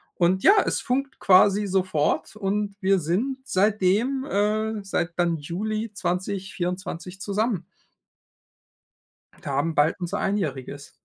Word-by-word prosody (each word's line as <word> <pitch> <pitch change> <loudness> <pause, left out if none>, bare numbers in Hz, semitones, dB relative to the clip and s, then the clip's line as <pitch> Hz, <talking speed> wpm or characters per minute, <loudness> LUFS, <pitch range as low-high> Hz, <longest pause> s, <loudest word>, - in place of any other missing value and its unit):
und, 180 +2 +2
ja, 405 +1 +6
es - - -1
funkt 270 +1 -2
quasi 200 +2 +5
sofort 180 -3 0
und 205 0 -2
wir 190 0 +3
sind 210 - -1
seitdem, 215 +7 +1
äh 210 +1 0
seit 175 -3 -2
dann 170 -2 +1
Juli 215 +8 -3
2024 185 -1 -4
zusammen. 205 -3 -1 1.8
Wir - - -20
haben 145 +4 0
bald 150 +5 +2
unser 180 +3 -3
Einjähriges. 145 -8 -3
195 Hz, 115 wpm, -25 LUFS, 175-210 Hz, 1.8 s, ja